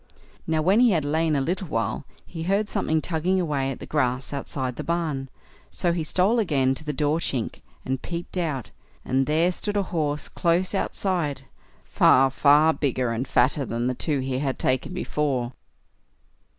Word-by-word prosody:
Now 160 -1 +1
when 190 +6 +4
he 245 -4 +5
had 155 -4 0
lain 155 +1 +1
a 140 - +1
little 180 +6 -2
while, 115 +1 -2 0.2
he 165 - -7
heard 200 +5 +1
something 160 -6 0
tugging 180 +3 0
away 145 -6 0
at 135 - -5
the - - -7
grass 130 -3 -1
outside 130 -2 -3
the - - -5
barn, 155 -6 -2 0.4
so 175 - 0
he 170 -2 -1
stole 190 +9 +2
again 135 -10 +2
to 135 - -7
the 150 - -2
door 150 +2 +1
chink, 130 -8 -3 0.2
and 130 0 -2
peeped 170 +1 -6
out, 155 -9 -2 0.3
and 135 +1 +1
there 160 +4 +3
stood 205 +3 -3
a 200 - +2
horse 150 -3 -1
close 175 +2 0
outside—far, 145 -7 +1
far 150 +4 +5
bigger 130 -5 -1
and 120 +3 -2
fatter 140 +3 +2
than 120 -1 -2
the 125 - +1
two 145 +2 -1
he 130 0 -2
had 135 -2 -1
taken 130 +7 0
before. 140 -8 -1
150 Hz, 175 wpm, -25 LUFS, 135-170 Hz, 0.4 s, he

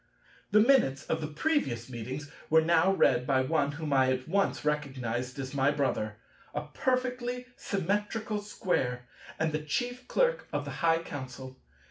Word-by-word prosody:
The 210 - +5
minutes 215 - +4
of 160 - -1
the 155 - -2
previous 150 - 0
meetings 130 +4 -6 0.2
were 160 0 +6
now 170 +3 +4
read 125 -9 +3
by 130 -2 +3
one 145 +1 +1
whom 150 -1 -3
I 130 -1 +4
at 130 0 -2
once 195 -2 +1
recognized 130 -4 -2
as 135 0 -5
my 135 0 +3
brother, 135 -7 0 0.4
a 150 - 0
perfectly 250 -1 -1
Symmetrical 210 +3 -1
Square, 130 -12 -1 0.3
and 160 0 +1
the 155 - -1
Chief 245 - -3
Clerk - - +1
of - - -2
the - - -5
High 165 0 +3
Council. 130 -3 -7
150 Hz, 155 wpm, -30 LUFS, 130-205 Hz, 0.4 s, were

